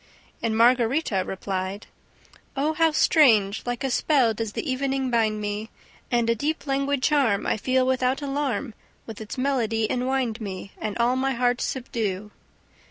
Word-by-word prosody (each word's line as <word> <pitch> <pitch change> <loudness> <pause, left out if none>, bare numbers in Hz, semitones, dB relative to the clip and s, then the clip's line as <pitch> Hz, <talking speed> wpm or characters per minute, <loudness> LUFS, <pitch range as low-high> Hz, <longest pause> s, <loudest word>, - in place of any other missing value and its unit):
And 220 -1 0
Margarita 235 -2 +3
replied: 190 +1 -4 0.7
"Oh, 300 +3 +1
how 325 +1 +3
strange! 225 -10 +4
Like 245 +2 -2
a 270 - -1
spell 255 -3 +3
does 220 -1 -4
the - - -4
evening 265 0 -1
bind 220 -2 +1
me! 210 +1 -4 0.4
And 235 -1 +1
a 230 - +3
deep 295 +8 -2
languid 275 -1 0
charm 265 -10 +2
I - - +1
feel 255 +4 +1
without 260 0 +1
alarm 275 -4 -2 0.3
With 225 -1 -9
its 215 +3 -7
melody 235 -5 0
enwind 250 -1 -1
me 195 -1 -6
And 215 0 -3
all 240 +2 +2
my 265 +1 0
heart 245 0 +1
subdue." 215 -6 -3
245 Hz, 155 wpm, -25 LUFS, 215-270 Hz, 0.7 s, strange